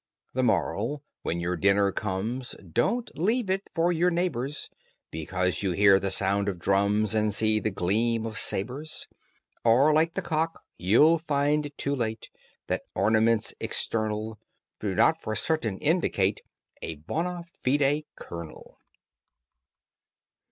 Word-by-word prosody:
THE 130 - 0
MORAL: 125 +3 0 0.2
When 85 - -2
your 90 +1 -1
dinner 100 +3 +3
comes 110 +7 -3
Don't 120 - -1
leave 210 +4 0
it 195 +1 -2
for 170 +1 +2
your 175 +1 +2
neighbors, 150 -6 -2 0.4
Because 90 +3 -2
you 95 -3 0
hear 100 +1 +6
the 95 0 -2
sound 100 +1 +1
of 95 - -4
drums 100 +4 +1
And 110 -1 +2
see 110 +1 +2
the 110 - -1
gleam 110 +5 0
of 110 0 -3
sabres; 130 +10 -3 0.6
Or, 130 +7 +5
like 160 +2 +2
the 195 - -2
cock, 165 -1 -1
you'll 150 - +4
find 145 -1 0
too 140 +1 -1
late 110 -3 -3 0.3
That - - -1
ornaments 110 0 +2
external 110 -1 -2 0.4
Do 100 -3 -2
not 160 - +3
for 110 - -3
certain 120 -12 -1
indicate 145 - +1 0.4
A 80 - -5
bona 170 - -3 0.2
fide 145 +3 +2
kernel. 85 -2 -10
115 Hz, 130 wpm, -27 LUFS, 100-155 Hz, 0.6 s, hear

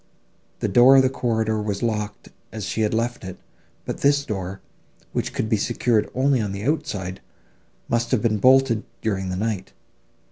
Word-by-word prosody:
The - - +1
door 125 +3 +7
of 135 - +7
the 130 - +2
corridor 110 -4 0
was 105 +1 -3
locked 105 -3 -3 0.2
as 110 -3 -5
she 110 - -2
had 105 - +1
left 120 +2 -1
it, 95 -1 -7 0.5
but - - -4
this 140 0 +3
door, 95 -5 -4 0.5
which - - -2
could - - -2
be 110 -1 +2
secured 115 0 +1
only 130 -1 +2
on 100 -2 -3
the 100 +1 -5
outside, 125 - -2 0.7
must 115 0 0
have 125 -5 +1
been 110 -2 +2
bolted, 130 -2 +4 0.2
during 95 -4 -1
the 90 - -2
night. 105 0 -3
110 Hz, 175 wpm, -23 LUFS, 105-125 Hz, 0.7 s, door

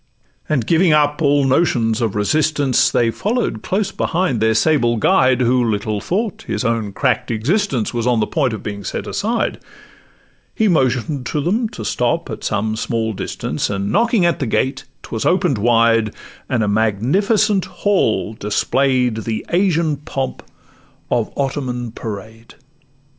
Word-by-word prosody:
And 135 -7 +1
giving 165 +2 +3
up 150 0 +2
all 145 -1 +3
notions 120 -6 +1
of 110 -4 -1
resistance, 145 +4 +2
They 115 -1 +2
follow'd 210 - -2
close 195 +1 -1
behind 170 -9 -1
their 110 +1 +2
sable 120 -2 +2
guide, 130 +3 +3
Who 125 +1 +3
little 105 -2 -1
thought 210 - -2
that 220 - -16
his - - -2
own 115 -3 -1
crack'd - - 0
existence 130 - 0
Was 120 0 -1
on 120 -2 +2
the 105 - +2
point 135 -1 0
of 110 - -6
being 100 -1 -5
set - - -4
aside: 225 +3 -1 1.0
He 220 - +2
motion'd 130 - +1
them 195 - 0
to 215 - -8
stop 125 +4 -1
at 110 - -7
some 110 +2 -1
small 110 0 -2
distance, - - -3
And 100 0 -2
knocking 225 -2 +2
at 170 - +1
the 135 - -1
gate, 130 +4 -1 0.2
'twas 110 -2 -4
open'd 175 - +2
wide, 115 -1 +3 0.3
And 120 -3 +1
a - - 0
magnificent 185 - +1
large - - -19
hall 185 - +1
display'd 125 +3 0
The 110 0 -4
Asian 170 -4 +1
pomp 135 -3 -4 0.7
of 115 -2 0
Ottoman 130 -4 -2
parade. 110 +1 -8
130 Hz, 155 wpm, -19 LUFS, 110-165 Hz, 1.0 s, giving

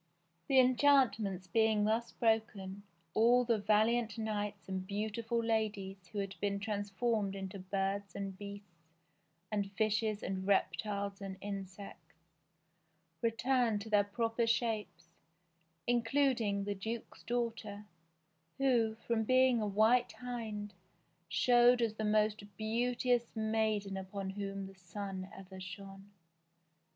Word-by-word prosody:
The 270 - +3
enchantments 250 -8 +4
being 220 +2 +3
thus 225 +3 +1
broken, 215 -4 0 0.3
all 240 +3 +5
the 230 -2 +2
valiant 220 +2 +2
knights 210 -2 -3
and 190 -1 -4
beautiful 220 +3 -2
ladies 205 -4 -1
who 185 - -9
had 195 -1 -2
been 200 -1 0
trans 205 0 -3
formed 205 -1 0
into 195 0 -6
birds 195 +1 -2
and 195 -1 -4
beasts 200 -4 -10 0.6
and 200 -2 -1
fishes 215 0 0
and 190 0 -3
reptiles 200 0 0
and 195 -1 -6
in 200 -1 -4
sects, 180 -4 -12 1.1
returned 230 -1 +2
to 220 +1 -8
their 205 -1 +5
proper 225 +3 -1
shapes, 210 -8 -1 0.7
including 235 -4 +2
the 205 0 -1
duke's 220 +4 -6
daughter, 225 -4 -3 0.7
who, 240 -5 +2
from 230 -1 +1
being 255 0 +4
a 210 - 0
white 220 +5 +3
hind, 220 -5 -5 0.6
showed 245 +5 +5
as 230 -3 +1
the 220 0 -3
most 210 -1 +1
beauteous 240 +2 0
maiden 220 -3 0
upon 190 0 -4
whom 195 0 -4
the 195 - -10
sun 190 +1 -6
ever 190 0 -10
shone. 195 +2 -9
210 Hz, 120 wpm, -34 LUFS, 195-230 Hz, 1.1 s, all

